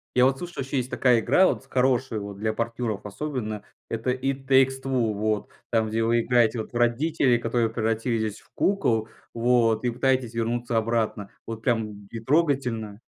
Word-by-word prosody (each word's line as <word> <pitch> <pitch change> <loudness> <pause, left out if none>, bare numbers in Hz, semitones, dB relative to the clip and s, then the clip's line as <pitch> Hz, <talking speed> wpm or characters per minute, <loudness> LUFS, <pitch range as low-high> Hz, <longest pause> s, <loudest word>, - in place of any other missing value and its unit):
Я 125 - +6
вот 135 0 +2
слышал, 175 -3 -6
еще 135 +1 -3
есть 125 0 -1
такая 125 -3 +3
игра 145 +11 +4
вот - - -1
с - - -27
хорошей, 130 -3 +1
вот 100 -1 -7
для 110 +1 -1
партнеров 115 -2 -3
особенно. 110 -2 -4 0.3
Это 115 +2 -1
"It 135 +1 -3
Takes 135 0 +4
Two", 125 -5 0
вот. 105 +1 -1 0.2
Там, 110 -2 +2
где 115 +1 0
вы 115 +1 +3
играете 120 -1 +2
вот - - -10
в - - -14
родителей, 125 +2 +2
которые 115 0 0
превратились 110 -1 -1
в - - -25
кукол, 120 - +1 0.2
вот. 115 -1 +2
И 125 - +1
пытаетесь 130 -1 0
вернуться 120 +1 -1
обратно. 110 -3 -1 0.2
Вот 115 -1 -6
прям, 115 -1 +1
м, 100 -1 -11
и 115 - -6
трогательно. 125 -7 0
120 Hz, 185 wpm, -25 LUFS, 110-130 Hz, 0.3 s, Я